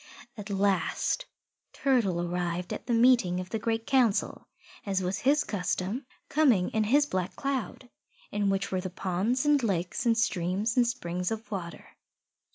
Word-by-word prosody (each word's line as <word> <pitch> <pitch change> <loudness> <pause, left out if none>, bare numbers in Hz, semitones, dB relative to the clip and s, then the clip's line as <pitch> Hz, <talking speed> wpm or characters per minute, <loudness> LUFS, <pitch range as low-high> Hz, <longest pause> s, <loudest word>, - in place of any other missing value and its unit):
At 210 -2 -8
last 200 - 0 0.5
Turtle 230 -10 +1
arrived 175 0 -2
at - - -7
the 240 - +1
meeting 230 -7 +4
of 185 0 -7
the 225 - -1
Great 225 +1 -1
Council, 245 -6 +1 0.4
as 195 -2 -1
was 180 +1 -1
his 290 +3 +3
custom, 200 - -2 0.2
coming 255 -12 +3
in 220 - +1
his 285 +7 +4
Black 185 -9 -3
Cloud, 265 -3 -3 0.4
in 205 -1 0
which 195 0 -1
were 185 -1 0
the 185 - -4
ponds 195 +9 -1
and 295 -1 +4
lakes 185 -5 -1
and 230 -1 +3
streams 200 +1 0
and 245 -2 +4
springs 180 -7 -2
of 225 +1 -5
water. 175 -4 -6
205 Hz, 160 wpm, -28 LUFS, 180-245 Hz, 0.5 s, meeting